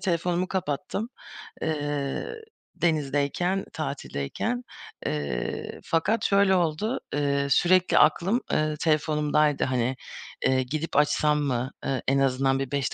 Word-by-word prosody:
telefonumu 180 -1 0
kapattım, 185 +5 -2 0.5
eee, 145 -3 -2 0.5
denizdeyken, 155 +4 0
tatildeyken. 155 - -3 0.4
Eee, 70 -5 -3
fakat 165 +8 +1
şöyle 195 -1 +4
oldu, 180 +8 0
eee, 140 -1 +1
sürekli 180 +6 +4
aklım, 185 +10 +4
eee, 155 0 +1
telefonumdaydı, 150 -1 +2
hani, 130 0 0 0.5
eee, 130 0 +3
gidip 155 +5 -4
açsam 150 0 +3
mı? 130 -2 -1
Eee, 135 -1 -1
en 135 +1 +3
azından 135 0 +2
bir 135 -2 -3
5 140 -2 -1
150 Hz, 110 wpm, -26 LUFS, 135-175 Hz, 0.5 s, şöyle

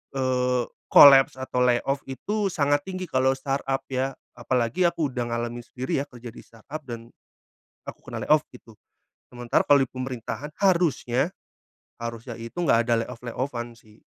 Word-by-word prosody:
eee, 125 -1 +1 0.3
kolaps 135 -2 +8
atau 130 -1 -3
layoff 125 +3 +2
itu 205 +10 -2
sangat 145 -4 +1
tinggi 185 -1 -4
kalau 130 +1 +2
startup 135 0 -2
ya, 130 +1 -1 0.2
apalagi 125 +8 +1
aku 155 -5 -1
udah 120 -1 -3
ngalamin 120 +1 -4
sendiri 130 +1 -3
ya 145 - -6
kerja 120 -3 -10
di - - -13
startup, 115 +7 -10
dan 115 0 -8 0.8
aku - - -7
kena - - -6
layoff 155 0 +5
gitu. 115 -3 -15 0.6
Sementara 120 -1 0
kalau 140 -1 +6
di 130 - -3
pemerintahan 130 +3 -6
harusnya 170 -4 +2 0.6
harusnya 115 0 -6
itu 115 0 -9
enggak 115 -8 +3
ada 120 - +3
layoff-layoff-an 120 0 -5
sih. 110 -2 -21
130 Hz, 150 wpm, -25 LUFS, 120-140 Hz, 0.8 s, kolaps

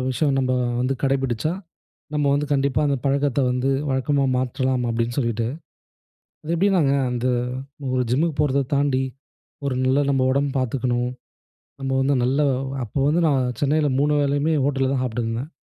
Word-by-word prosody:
விஷயம் 140 +1 +1
நம்ம 130 -1 +1 0.3
வந்து 130 +2 0
கடைப்பிடிச்சா, 135 +1 0 0.6
நம்ம 150 -1 +1
வந்து 145 +1 0
கண்டிப்பா 140 +1 +1
அந்த 140 -1 +1
பழக்கத்த 140 0 +1
வந்து 125 +2 0 0.2
வழக்கமா 135 +1 +1
மாற்றலாம்." 130 0 0
அப்பிடின்னு 115 +1 -1
சொல்ட்டு. 115 -2 0 1.0
அது 160 - -2
எப்பிடின்னாங்க 170 -6 +3 0.2
அந்த 125 0 -2 0.7
ஒரு 130 -1 +1
ஜிம்முக்கு 150 +4 +1
போறத 140 -1 +2
தாண்டி, 140 -2 +2 0.6
ஒரு 130 - 0
நல்ல 130 +2 +3
நம்ம 135 -1 +2
உடம்பு 140 0 0
பார்த்துக்கணும். 125 -1 -1 0.7
நம்ம 135 0 -2
வந்து 140 +1 +2
நல்ல 135 +4 +1 0.4
அப்போ 115 +6 -5
வந்து 160 +4 +2
நான் 130 -3 +1
சென்னையில 150 +1 +2
3 150 +1 +2
வேளையுமே 145 +3 +1
ஹோட்டல்ல 135 -1 +1
தான் 135 - 0
சாப்பிட்டுருந்தேன். 115 +3 -3
135 Hz, 145 wpm, -22 LUFS, 125-145 Hz, 1.0 s, எப்பிடின்னாங்க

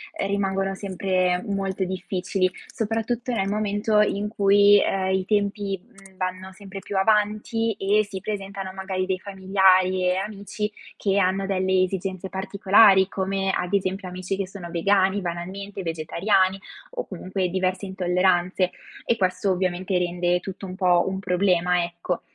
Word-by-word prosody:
ehm, - - -2
rimangono 195 -1 0
sempre 185 -2 0
molto 195 -1 -2
difficili, 185 0 -1 0.2
soprattutto 225 +3 -2
nel 195 -3 0
momento 210 +1 +1
in 205 0 0
cui, 205 -1 +5
ehm, 190 -1 0
i 190 -1 0
tempi, 200 -1 0
mhmm, 195 -5 -19
vanno 185 +1 -4
sempre 195 0 -9
più 195 +1 -7
avanti 215 +2 +1
e 205 +2 +2
si 195 -2 -6
presentano 195 -2 -5
magari 190 -1 -3
dei 185 -1 -1
familiari 190 -1 +3
e 180 - +2
amici, 205 +2 -4 0.3
che 200 -1 0
hanno 190 +1 +1
delle 190 -1 +2
esigenze 190 0 -3
particolari, 195 0 +4
come 195 0 -1
ad 180 +1 -2
esempio 190 -1 -1
amici 185 +1 -4
che 195 -2 -2
sono 185 -3 -9
vegani 195 +3 +2
banalmente, 190 +3 -5
vegetariani, 185 +4 +1 0.3
o - - -4
comunque 185 -1 -3
diverse 185 +1 -1
intolleranze, 185 0 +1 0.3
e 230 - +1
questo 185 +1 +1
ovviamente 185 0 -1
rende 175 0 0
tutto 195 +1 -8
un 185 -1 -7
po' 180 -2 +3
un 190 0 -2
problema, 180 -2 +2
ecco. 170 0 -4
190 Hz, 145 wpm, -24 LUFS, 185-200 Hz, 0.3 s, cui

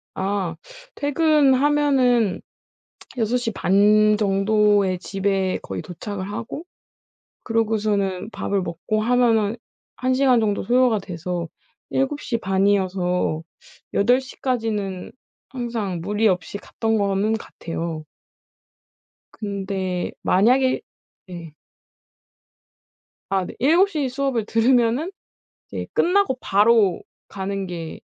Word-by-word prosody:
아. 190 -3 -2 0.4
퇴근하면은 285 - +3 0.8
6 235 0 +1
시 245 -2 -2
반 210 +3 +4
정도에 205 -1 +2
집에 195 0 -1
거의 95 -1 -5
도착을 190 +2 -6
하고 230 +9 -6 0.8
그러고서는 210 -4 0
밥을 200 -2 -1
먹고 180 +5 -2
하면은 230 -2 +2 0.4
1 255 0 0
시간 255 -2 +4
정도 210 -2 0
소요가 245 -2 +3
돼서 175 -2 -4 0.4
7 270 +2 -1
시 235 - -2
반이어서 190 -4 0 0.5
8 245 +6 +3
시까지는 225 -8 -3 0.4
항상 230 -8 -3
무리 210 +5 +1
없이 185 +1 -1
갔던 225 +2 -2
거는 200 +1 +1
같아요. 165 -6 -6 1.4
근데 195 -3 -3
만약에 255 +7 +3 0.5
예. 170 -4 -9 1.8
아 190 -1 +1
네 - - -9
7 335 +10 +4
시 290 -6 -1
수업을 260 -4 -1
들으면은 240 - +2 0.6
이제 - - -5
끝나고 360 -7 +2
바로 205 -2 +3 0.3
가는 195 0 -4
게 170 -3 -7
210 Hz, 190 characters per minute, -22 LUFS, 190-245 Hz, 1.8 s, 반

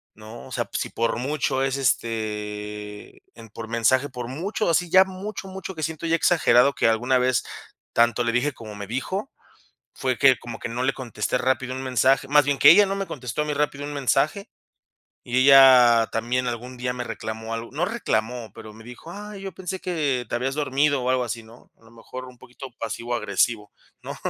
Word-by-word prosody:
¿no? 110 +2 -11
O - - -15
sea, - - -2
pues, - - -4
si - - -4
por 115 0 -1
mucho 135 0 -1
es, 135 0 -1
este, 105 -4 -3
en 115 -1 -13
por 110 +1 -8
mensaje, 125 +5 +1
por 125 -2 -6
mucho, 175 - -2
así 170 +1 +1
ya 190 +2 +7
mucho, 195 +1 -7
mucho 190 0 -7
que 155 - -5
siento 160 +1 -4
ya 165 - +3
exagerado 140 -6 +4
que - - +1
alguna 120 +3 +2
vez 125 -1 +1 0.5
tanto 120 +1 +3
le 115 - 0
dije 125 +4 0
como 110 -4 -10
me 100 -1 -7
dijo, 190 - -4 0.6
fue 130 -2 -1
que 135 -3 +5
como 120 -1 -8
que 120 - -5
no 120 +2 -3
le 135 - +2
contesté 120 -2 -3
rápido 130 0 -1
un 130 - -5
mensaje, 130 +1 +2
más 145 +1 +5
bien 140 0 0
que - - +8
ella 200 +4 +7
no 195 - -2
me 195 -1 -3
contestó 125 +2 -4
a - - -2
mí 150 - -2
rápido 145 -1 -2
un 145 - -5
mensaje, 145 - 0 0.8
y 130 0 +1
ella 130 -4 +7
también 125 +3 -1
algún 125 +1 -5
día 125 0 -2
me 125 -1 -4
reclamó 110 0 -6
algo. 115 +1 -5
No, 155 +5 -1
reclamó, 120 - -2
pero 110 -1 -11
me 110 +1 -14
dijo: 125 +7 -11
"Ay, 205 -1 -9
yo 195 -2 -6
pensé 190 +2 -5
que 145 -9 -1
te - - -5
habías 130 +3 -1
dormido 145 -1 +1
o 125 - 0
algo 130 -1 +1
así", 115 0 -5
¿no? 115 +2 -18
A 115 - -27
lo 110 - -18
mejor 125 +2 -10
un 125 -1 -13
poquito 130 +2 -11
pasivo 120 +1 -4
agresivo, 105 0 0 0.3
¿no? - - -7
125 Hz, 210 wpm, -24 LUFS, 115-145 Hz, 0.8 s, que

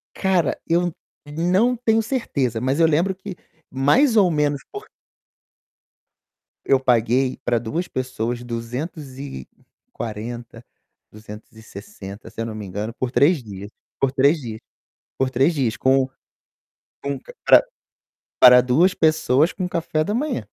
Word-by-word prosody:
Cara, 190 -3 +1
eu 175 0 +1 0.3
não 180 +11 +1
tenho 225 -2 +1
certeza, 140 - -2
mas 135 +5 0
eu 165 - +6
lembro 170 +5 +1
que 190 -1 -9 0.3
mais 220 - +3
ou 190 -4 +5
menos 150 -2 0
por 415 +2 -8 1.8
Eu 135 -1 +3
paguei 125 +1 +1
pra 120 -1 +1
2 160 +11 -4
pessoas 120 -2 -3
240, 120 - -7 0.5
260, 105 -1 -11
se - - -8
eu 115 - -2
não 110 - -6
me 105 -2 -7
engano, 105 +4 -5
por 130 -1 -2
3 145 +1 +3
dias, 100 -1 -9 0.3
por 135 -1 +1
3 140 +4 +3
dias, 110 -3 -7 0.6
por 130 -1 +1
3 135 +6 +2
dias 125 -6 -1
com 130 0 +2 0.9
com 140 0 -3
ca - - -14
para - - +7 0.8
para 125 0 +9
2 160 +10 +3
pessoas 155 -1 +2
com 180 -2 -4
café 165 -2 -1
da 205 - -3
manhã. 260 +1 -1
135 Hz, 130 wpm, -22 LUFS, 120-170 Hz, 1.8 s, para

